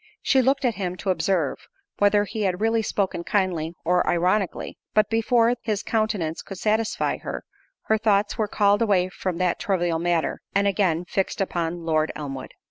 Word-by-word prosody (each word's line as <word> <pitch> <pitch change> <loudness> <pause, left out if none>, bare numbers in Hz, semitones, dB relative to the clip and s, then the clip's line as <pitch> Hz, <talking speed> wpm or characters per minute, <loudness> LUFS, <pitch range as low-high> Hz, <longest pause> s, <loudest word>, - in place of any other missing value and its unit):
She 265 - +4
looked 270 +2 +2
at 240 - +2
him 180 -1 -2
to 190 - -1
observe, 175 -3 -1 0.3
whether 205 0 +4
he 215 +1 -5
had 185 -3 0
really 225 +1 +2
spoken 195 -4 -1
kindly, 175 -4 -1
or 180 +1 +2
ironically; 180 +2 0 0.2
but 215 0 +3
before 230 +1 +3
his 215 -2 -2
countenance 210 -8 -1
could 195 - -9
satisfy 215 +3 0
her, - - -6 0.4
her 220 0 +1
thoughts 205 -2 +2
were 215 - 0
called 205 0 +2
away 190 -5 +2
from 185 -2 -4
that 180 -1 0
trivial 175 -4 0
matter, 170 -1 0
and 200 0 +3
again 180 -4 +1
fixed 195 +1 -2
upon 170 -3 -2
Lord 155 -1 +1
Elmwood. 135 -3 -6
195 Hz, 170 wpm, -24 LUFS, 175-215 Hz, 0.4 s, She